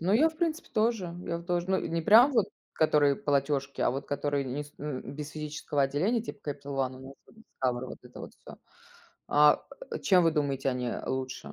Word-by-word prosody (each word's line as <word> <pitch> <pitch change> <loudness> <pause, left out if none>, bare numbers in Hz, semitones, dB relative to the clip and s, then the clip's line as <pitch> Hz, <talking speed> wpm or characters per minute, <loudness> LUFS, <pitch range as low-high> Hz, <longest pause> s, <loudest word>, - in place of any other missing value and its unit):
Ну 180 +4 +1
я, 300 +9 +5
в 315 - -13
принципе, 330 -2 -1
тоже. 215 -6 0
Я 170 - -2
вот 170 - -12
тоже. 175 0 -1
Ну 190 - +2
не 165 0 -2
прям 235 - +7
вот, 225 -7 +3 0.3
которые 145 -3 +3
платежки, 140 -1 -1
а - - +3
вот 135 +2 -4
которые 145 -1 -1
не 135 +3 -4
с 145 - -16
н 145 -3 -4
без 150 0 -6
физического 150 -1 -2
отделения 180 - +1
типа 205 -9 -6
Capital 140 0 -6
One 130 -1 -1
у - - -12
нас 135 - -11
вот - - -21 0.2
Discover, 125 -1 0
вот - - -9
это 125 0 -12
вот - - -9
всё. - - -13 0.7
А 150 0 +5 0.4
чем 185 -3 +5
вы 165 - +5
думаете, 140 -3 0
они, 125 -1 -2
э, 120 - -4
лучше 130 0 -4
150 Hz, 215 wpm, -29 LUFS, 135-180 Hz, 0.7 s, прям